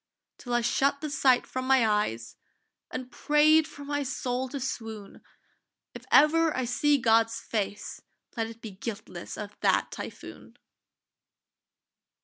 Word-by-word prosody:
Till 245 -2 -3
I 240 - +3
shut 275 +4 +1
the 305 -1 -5
sight 265 -3 +3
from 255 0 -4
my 260 -4 +4
eyes 120 - -1 0.5
And 255 0 -6
prayed 305 +1 +4
for 285 -2 -11
my 290 0 -1
soul 255 -1 -2
to 280 +2 -5
swoon: 225 -5 -6 0.7
If - - -10
ever 315 0 +5
I 260 - 0
see 290 +4 +2
God's 230 -1 +2
face, 205 -3 -4 0.3
let 225 -2 -1
it 230 0 -12
Be 220 - -6
guiltless 195 -3 -7
of 210 -1 -7
that - - +2
typhoon! - - -9
250 Hz, 135 wpm, -28 LUFS, 225-285 Hz, 0.7 s, ever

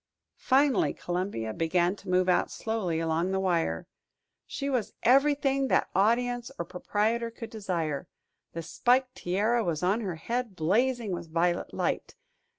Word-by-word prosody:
Finally, 270 -2 +3
Columbia 175 - -3
began 175 - +1
to 200 - -11
move 180 0 +3
out 180 - +3
slowly 205 -8 -2
along 165 +2 0
the 190 0 0
wire. 165 - 0 0.6
She 275 - -4
was 250 -6 -1
everything 275 +1 +3
that - - +1
audience 240 +4 +1
or 170 - -3
proprietor 215 +6 -1
could 230 0 -9
desire. 170 -9 -3 0.5
The 165 - -5
spiked 250 +9 +2
tiara 215 +6 0
was 170 -3 -2
on 195 +6 +2
her 190 -6 -3
head, 235 +5 -3
blazing 225 +7 +1
with 170 -2 -5
violet 175 +1 0
light. - - -2
195 Hz, 145 wpm, -28 LUFS, 175-240 Hz, 0.6 s, Finally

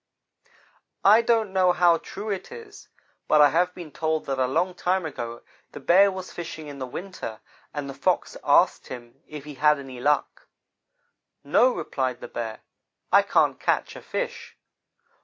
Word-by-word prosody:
"I 215 +4 +7
don't 225 -4 +1
know 185 -2 +4
how 175 -2 +4
true 210 +2 -6
it 195 - -5
is, 450 -3 -12 0.4
but 155 - +4
I 145 -1 +7
have 180 +3 +2
been 170 -4 -9
told 160 0 -1
that 135 -1 -2
a 130 - +2
long 170 +7 0
time 180 0 0
ago 120 -6 -6 0.3
the - - -7
Bear 195 +3 +5
was 185 -1 -7
fishing 160 -2 -7
in 145 -1 -9
the 130 - -4
winter, 150 - -7 0.3
and 145 -2 -5
the 135 - -6
Fox - - 0
asked - - +3
him 120 -2 -10
if 150 -2 -8
he 150 0 -9
had 150 +2 +3
any 135 -3 -9
luck. 145 +3 0 1.0
"'No,' 255 - +4
replied 130 -2 -2
the - - -8
Bear, 110 -2 -6 0.5
'I - - +7
can't - - +2
catch - - 0
a - - -9
fish.' - - -5
160 Hz, 170 wpm, -25 LUFS, 135-185 Hz, 1.0 s, I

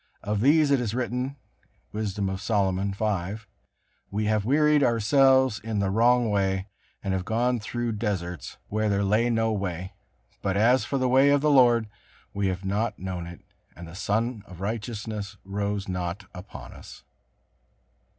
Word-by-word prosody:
Of 105 0 -1
these 145 +3 +4
it 140 - +4
is 115 -2 -2
written, 125 +2 -2 0.6
Wisdom 105 -2 -2
of 95 0 -4
Solomon 100 -2 0
v: 100 0 -2 0.7
"We 105 +2 -2
have 105 -1 +1
wearied 150 +3 +4
ourselves 130 +1 +4
in 110 0 -4
the 100 -1 +1
wrong 120 +1 +3
way; 95 -1 0 0.4
and 95 -2 -1
have 95 -1 -1
gone 120 +4 0
through 120 +2 -3
deserts, 95 -6 -4
where 110 +1 0
there 100 0 +1
lay 110 +4 +2
no 115 -1 +1
way; 95 -2 -4 0.5
but 100 -1 0
as 120 +5 +4
for 140 - -1
the 130 -1 +1
way 135 +3 +5
of 140 -1 +4
the 150 0 +3
Lord, 120 -5 +5 0.5
we 100 -1 0
have 95 +1 -3
not 105 +2 -1
known 90 -2 -5
it, 85 0 -10 0.3
and 85 +2 -9
the 80 - -11
sun 110 +4 -1
of 90 -2 -12
righteousness 105 -1 -4
rose 100 0 -2
not 90 +2 -3
upon 90 +1 -10
us." - - -12
105 Hz, 160 wpm, -26 LUFS, 95-120 Hz, 0.7 s, way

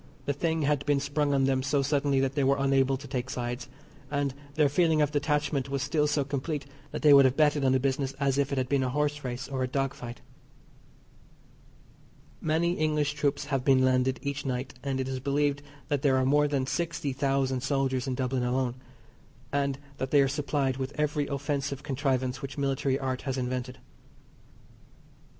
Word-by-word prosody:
The 145 - 0
thing 160 +2 0
had 145 -1 +1
been 145 -1 +3
sprung 145 +1 0
on 135 -1 +2
them 135 -1 +2
so 135 +1 +1
suddenly 140 -1 +1
that 135 0 0
they 140 -1 +1
were 135 +1 +3
unable 135 -1 +2
to 140 +2 -10
take 130 -1 -3
sides, 120 -1 -4 0.4
and 140 -1 -1 0.2
their 155 -2 +4
feeling 160 +2 +2
of 150 -1 +2
detachment 145 -2 0
was 140 -1 -1
still 150 +1 +1
so 145 -1 +1
complete 145 +1 -3 0.2
that - - -6
they 150 -1 +8
would 140 -1 +8
have 130 0 +2
betted 150 -2 +3
on 130 - +4
the 130 - +3
business 135 0 -1
as 140 -1 +1
if 140 0 +1
it 140 - -1
had 130 -1 0
been 140 0 +1
a 130 - 0
horse 150 +2 -1
race 125 0 -4
or 135 -1 -3
a 130 - +1
dog 135 +1 -1
fight. 120 0 -9 2.2
Many 165 +2 +1
English 150 -1 +1
troops 145 -1 -1
have 135 -2 +1
been 130 -1 +4
landed 130 0 +2
each 140 0 -3
night, 130 -1 -3
and 135 -1 -1
it 130 - -1
is 130 -1 -3
believed 145 +1 0 0.3
that 145 -2 0
there 135 -2 +3
are 130 - +2
more 145 +2 +4
than 140 -2 0
sixty 165 -2 -2
thousand 135 -1 0
soldiers 135 -1 0
in 130 - -1
Dublin 130 0 -1
alone, 125 0 0 0.8
and 140 -1 0 0.2
that 130 - -2
they 145 -1 +5
are - - +2
supplied 140 -1 -1
with 135 +3 -5
every 150 -1 0
offensive 140 -1 -2
contrivance 130 -2 -1
which 140 +1 -6
military 135 -1 0
art 130 -2 -3
has 135 -1 -3
invented. 125 0 -3
140 Hz, 195 wpm, -28 LUFS, 130-145 Hz, 2.2 s, they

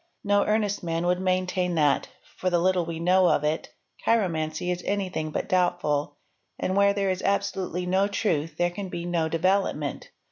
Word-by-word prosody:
No 205 0 +3
earnest 210 -1 +1
man 165 0 -2
would 180 0 +2
maintain 185 -1 0
that, 150 -3 +2 0.3
for 185 - -1
the 175 - +2
little 180 -1 +1
we 165 -1 -4
know 180 +2 +4
of 145 - +2
it, 155 +2 -1 0.3
chiromancy 170 -6 0
is 180 0 -3
anything 185 -6 -2
but - - -3
doubtful, 175 -6 0 0.4
and 185 - -1
where 200 0 +5
_ - - -12
there 200 -1 0
1 - - +3
is 185 - -3
absolutely 195 -2 -1
no 190 +2 +2
truth 165 -7 -1
there 175 0 +1
can 195 +1 -6
be 170 -1 -5
no 170 -2 0
development. 165 -4 0
180 Hz, 185 wpm, -26 LUFS, 165-195 Hz, 0.4 s, where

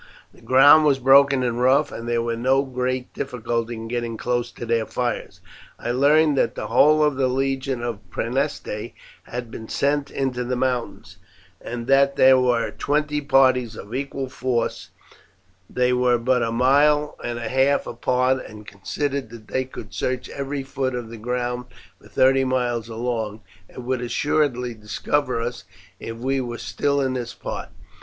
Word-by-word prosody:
The - - -20
ground 145 +4 +7
was 145 -3 +3
broken 135 0 +5
and 120 -1 -1
rough, 135 +4 +3
and 115 +1 -6
there 120 -1 +1
was 115 0 -1
no 135 +3 +3
great 130 -1 -3
difficulty 120 -2 -3
in 115 0 -7
getting 120 -1 -3
close 120 0 -1
to - - -7
their 115 -1 0
fires. 120 -1 -3 0.4
I 120 - -3
learned 145 +4 +4
that - - +1
the - - -4
whole 150 +6 +5
of 150 -3 +1
the 135 -1 +2
legion 135 -1 -1
at 110 -6 -5
Praeneste 120 - -3 0.3
had 120 -2 -6
been 110 - -8
sent 140 0 0
into 130 -2 -2
the 125 +1 -2
mountains, 125 -1 -3 0.5
and 120 0 -5
that 140 +1 +4
there 130 0 +6
were 125 -2 +1
twenty 150 0 -1
parties 130 -4 +3
of 105 +2 -10
equal 135 0 -3
force; 125 -2 -2 0.8
they 125 0 +1
were 125 -1 +3
but 125 +1 +1
a 115 -1 0
mile 145 +5 +3
and 120 0 -3
a 115 -1 -4
half 135 +3 +2
apart, 130 +1 0
and 105 0 -11
considered 135 +6 -3
that 115 -2 -13
they 130 0 -1
could 105 -5 -10
search 125 -1 -2
every 140 0 -4
foot 135 -1 -3
of 120 -2 -5
the 115 - -8
ground 125 +2 -3 0.4
for - - -17
thirty 135 +1 +3
miles 120 -3 -1
along, 115 -2 -3 0.3
and 125 - -10
would 130 -1 -1
assuredly 125 -1 0
discover 115 +5 -1
us 120 +1 -4 0.4
if 115 0 -7
we 135 +3 -1
were 120 -2 -5
still 140 +3 -1
in 130 -1 0
this 120 -2 -5
part. - - -6
125 Hz, 170 wpm, -23 LUFS, 120-135 Hz, 0.8 s, ground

